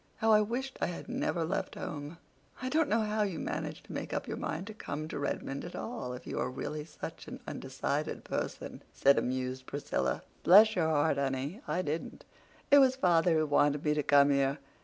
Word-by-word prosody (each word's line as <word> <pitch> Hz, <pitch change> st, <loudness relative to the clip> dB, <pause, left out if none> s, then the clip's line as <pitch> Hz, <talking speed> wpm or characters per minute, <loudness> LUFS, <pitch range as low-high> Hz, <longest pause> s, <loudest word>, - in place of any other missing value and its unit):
How 220 Hz, 0 st, +2 dB
I 215 Hz, 0 st, +7 dB
wished 250 Hz, +5 st, -3 dB
I -, -, +2 dB
had 175 Hz, -, -6 dB
never 255 Hz, -, -1 dB
left 185 Hz, +4 st, -2 dB
home!" 150 Hz, +2 st, -6 dB, 0.4 s
"I 255 Hz, -, -3 dB
don't 310 Hz, +1 st, +2 dB
know 225 Hz, +1 st, +3 dB
how 215 Hz, 0 st, 0 dB
you 195 Hz, -5 st, 0 dB
managed -, -, -4 dB
to -, -, -9 dB
make -, -, -4 dB
up -, -, -2 dB
your -, -, -3 dB
mind 165 Hz, +4 st, -3 dB
to 215 Hz, -, -7 dB
come 155 Hz, -7 st, -5 dB
to -, -, -5 dB
Redmond 140 Hz, -1 st, -3 dB
at 175 Hz, -, -7 dB
all, 225 Hz, -, -4 dB
if 125 Hz, -, -9 dB
you -, -, -4 dB
are 125 Hz, -, 0 dB
really 150 Hz, +4 st, -5 dB
such -, -, -8 dB
an -, -, -7 dB
undecided -, -, -3 dB
person," -, -, -4 dB
said 140 Hz, 0 st, +4 dB
amused 130 Hz, 0 st, -3 dB
Priscilla. 145 Hz, -, -2 dB, 0.2 s
"Bless 215 Hz, +5 st, +7 dB
your 165 Hz, -4 st, +2 dB
heart, 150 Hz, -1 st, +2 dB
honey, 140 Hz, -, -2 dB
I 175 Hz, +4 st, 0 dB
didn't. 155 Hz, +1 st, -4 dB, 0.5 s
It 285 Hz, -, +9 dB
was 260 Hz, -1 st, +5 dB
father 175 Hz, -7 st, +3 dB
who 155 Hz, -, +2 dB
wanted 145 Hz, 0 st, +2 dB
me 150 Hz, -, +3 dB
to 150 Hz, -, +1 dB
come 145 Hz, 0 st, +5 dB
here. 140 Hz, 0 st, +2 dB
160 Hz, 205 wpm, -31 LUFS, 145-215 Hz, 0.5 s, It